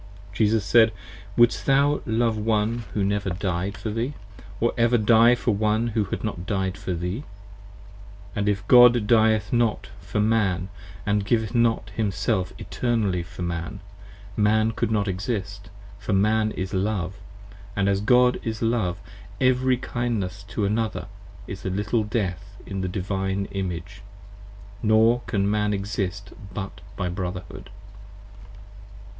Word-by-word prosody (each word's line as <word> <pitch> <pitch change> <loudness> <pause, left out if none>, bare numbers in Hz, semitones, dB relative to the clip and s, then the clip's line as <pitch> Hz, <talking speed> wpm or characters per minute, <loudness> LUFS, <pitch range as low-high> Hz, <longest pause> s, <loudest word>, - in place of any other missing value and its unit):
Jesus 110 0 +2
said. 115 0 +5 0.5
Wouldest 120 0 +4
thou 140 +2 +3
love 115 0 +1
one 110 +2 0
who 105 - +1
never 100 0 0
died 95 +2 -2
For 110 - -4
thee,~or 105 -2 -4
ever 120 +1 +3
die 115 +2 +5
for 120 -1 0
one 110 +3 +1
who 110 -2 0
had 95 - -5
not 95 -5 -4
died 95 -3 -1
for 95 - -4
thee. 90 +6 -3 1.1
25 - - -9
And 100 0 +1
if 100 0 -2
God 120 -2 +7
dieth 110 -2 +3
not 120 -3 +1
for - - -4
Man 100 -4 +1 0.3
& 105 0 +1
giveth 110 +2 0
not 115 -2 +1
himself 100 -2 -1
Eternally 110 -7 -1
for 85 +1 -8
Man, 85 -1 -4 0.6
Man 110 +1 +3
could 110 - -1
not 105 -2 0
exist, 100 +1 -4 0.3
for 105 0 -2
Man 110 +2 +3
is 95 0 -4
Love, 95 -1 -1 0.6
As 100 -1 +1
God 125 +3 +4
is 110 0 -4
Love: 110 -6 0 0.4
every 130 0 +3
kindness 115 -6 -3
to 105 0 -2
another 110 +1 -1 0.4
is - - -8
a - - -2
little 105 +4 0
Death 100 -2 -3
In 95 -1 -4
the 95 - -2
Divine 95 +1 -2
Image, 95 0 -5 0.8
nor 110 +2 +4
can 100 -3 0
Man 105 0 +1
exist 100 0 -4 0.2
but 95 -2 -6
by 90 - -2
Brotherhood. 90 0 -5
105 Hz, 140 wpm, -24 LUFS, 95-115 Hz, 1.1 s, God